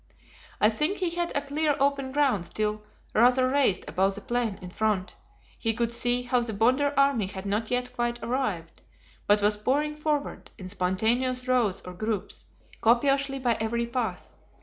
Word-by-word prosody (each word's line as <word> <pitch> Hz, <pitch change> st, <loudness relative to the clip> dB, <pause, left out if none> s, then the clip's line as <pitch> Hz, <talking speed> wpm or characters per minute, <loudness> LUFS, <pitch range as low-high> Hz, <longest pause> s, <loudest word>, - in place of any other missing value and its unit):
I 215 Hz, -, +4 dB
think 300 Hz, -, -1 dB
he 360 Hz, -3 st, -1 dB
had 345 Hz, 0 st, -1 dB
a 285 Hz, -, -1 dB
clear 295 Hz, +1 st, 0 dB
open 275 Hz, -1 st, +1 dB
ground 265 Hz, -11 st, +1 dB
still 215 Hz, +2 st, -2 dB, 0.3 s
rather 250 Hz, +3 st, +4 dB
raised 265 Hz, -7 st, +2 dB
above 195 Hz, +1 st, +1 dB
the 205 Hz, -, -7 dB
plain 235 Hz, -2 st, -1 dB
in 180 Hz, -1 st, -9 dB
front; 210 Hz, -2 st, -1 dB, 0.5 s
he 225 Hz, -2 st, 0 dB
could 235 Hz, 0 st, 0 dB
see 245 Hz, +1 st, +1 dB
how 245 Hz, 0 st, +1 dB
the 235 Hz, -2 st, -4 dB
Bonder 255 Hz, +7 st, +2 dB
army 275 Hz, -7 st, +3 dB
had 190 Hz, 0 st, -7 dB
not 210 Hz, +3 st, -1 dB
yet 250 Hz, 0 st, -1 dB
quite 240 Hz, -1 st, -1 dB
arrived, 210 Hz, -10 st, -3 dB, 0.5 s
but 205 Hz, 0 st, +4 dB
was 210 Hz, 0 st, +3 dB
pouring 290 Hz, +7 st, 0 dB
forward, 300 Hz, -1 st, -2 dB
in 185 Hz, -3 st, -8 dB
spontaneous 225 Hz, +8 st, 0 dB
rows 235 Hz, -7 st, +1 dB
or 180 Hz, -, -9 dB
groups, 210 Hz, +1 st, -4 dB, 0.3 s
copiously 275 Hz, +4 st, +3 dB
by 250 Hz, -3 st, +1 dB
every 235 Hz, +2 st, -1 dB
path. 235 Hz, -1 st, -4 dB
240 Hz, 170 wpm, -27 LUFS, 210-270 Hz, 0.5 s, I